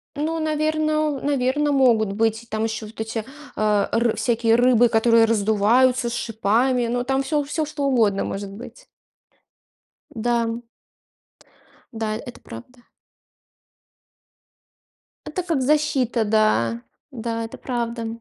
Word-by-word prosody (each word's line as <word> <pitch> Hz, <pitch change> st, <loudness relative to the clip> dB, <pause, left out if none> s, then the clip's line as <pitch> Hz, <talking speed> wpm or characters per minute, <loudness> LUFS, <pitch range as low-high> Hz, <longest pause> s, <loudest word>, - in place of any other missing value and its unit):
Ну, 320 Hz, +3 st, -2 dB
наверно, 310 Hz, -1 st, 0 dB
наверно, 285 Hz, +1 st, +1 dB
могут 235 Hz, -7 st, +3 dB
быть 225 Hz, +2 st, 0 dB
там 220 Hz, +1 st, -1 dB
еще 220 Hz, -1 st, -4 dB
вот 220 Hz, +1 st, -8 dB
эти, 220 Hz, 0 st, -4 dB, 0.3 s
э, 210 Hz, -2 st, +1 dB
р 235 Hz, 0 st, +1 dB
всякие 230 Hz, -1 st, +1 dB
рыбы, 245 Hz, 0 st, +4 dB
которые 230 Hz, 0 st, +4 dB
раздуваются 230 Hz, +4 st, +2 dB
с -, -, -5 dB
шипами, 235 Hz, +3 st, 0 dB
но 245 Hz, +1 st, -1 dB
там 270 Hz, +1 st, 0 dB
всё, 300 Hz, +1 st, 0 dB
всё, 300 Hz, +2 st, -2 dB
что 295 Hz, -2 st, -4 dB
угодно 220 Hz, -7 st, +2 dB
может 195 Hz, 0 st, -5 dB
быть. 245 Hz, -, -11 dB, 1.2 s
Да, 235 Hz, +1 st, 0 dB
м. 230 Hz, +1 st, -5 dB, 1.3 s
Да, 220 Hz, -1 st, -2 dB
это 245 Hz, -1 st, -10 dB
правда. 240 Hz, -, -12 dB, 2.4 s
Это 360 Hz, +3 st, -4 dB
как 330 Hz, -6 st, -1 dB
защита, 260 Hz, -5 st, +1 dB
да. 205 Hz, -, +1 dB, 0.3 s
Да, 230 Hz, -2 st, -4 dB
это 225 Hz, -, -10 dB
правда. 235 Hz, -2 st, -3 dB
235 Hz, 120 wpm, -22 LUFS, 220-270 Hz, 2.4 s, рыбы